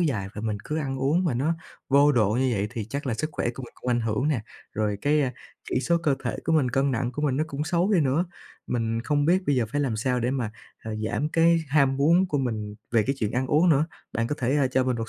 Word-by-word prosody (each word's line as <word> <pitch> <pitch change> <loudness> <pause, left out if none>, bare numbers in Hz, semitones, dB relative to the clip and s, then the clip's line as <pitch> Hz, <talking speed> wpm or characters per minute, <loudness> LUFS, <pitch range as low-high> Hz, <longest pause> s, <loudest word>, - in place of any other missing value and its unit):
dài 115 - 0
và 105 - -5
mình 110 -2 -2
cứ 155 +1 -2
ăn 135 -3 -3
uống 155 +8 +2
mà 145 -8 +1
nó 150 +7 +1 0.3
vô 140 +2 +5
độ 110 -5 +3
như 130 +4 +1
vậy 100 -1 0
thì 115 -4 -4
chắc 140 +5 -5
là 120 - 0
sức 155 +6 -3
khỏe - - -2
của 135 - -7
mình 120 - -10
cũng 125 - -5
ảnh 120 - +2
hưởng 115 +6 0
nè, 135 -7 +1 0.3
rồi 105 -2 -1
cái 145 -3 +2 0.4
chỉ 125 - +1
số 170 +6 +2
cơ 150 -4 +3
thể 120 - -1
của 165 - +1
mình, 145 -5 +3
cân 135 +2 +1
nặng 120 0 -1
của 150 - -4
mình 135 -3 +1
nó 155 - +1
cũng 145 -1 -4
xấu 175 +5 +1
đi 180 - +4
nữa. 145 +5 +2 0.4
Mình 115 -1 -1
không 145 +1 +1
biết 185 +4 +3
bây 145 -2 +2
giờ 125 - +2
phải 145 - +1
làm 130 -6 0
sao 125 +2 0
để 120 - 0
mà, 125 -5 -2 0.3
à, 110 - -7 0.2
giảm 150 +6 -1
cái 165 +1 +4
ham 140 -2 +3
muốn 170 +7 +4
của 145 -4 0
mình 110 -5 -3 0.2
về 115 -2 +4
cái 135 - -1
chuyện 110 0 -1
ăn 130 +1 0
uống 155 +6 +3
nữa. 150 -1 +4 0.3
Bạn 115 0 0
có 150 - -2
thể, 130 +3 +1
ờ, 140 -2 +3
cho 130 0 +2
mình 125 -2 0
một 115 -1 -4
135 Hz, 280 wpm, -26 LUFS, 120-150 Hz, 0.4 s, vô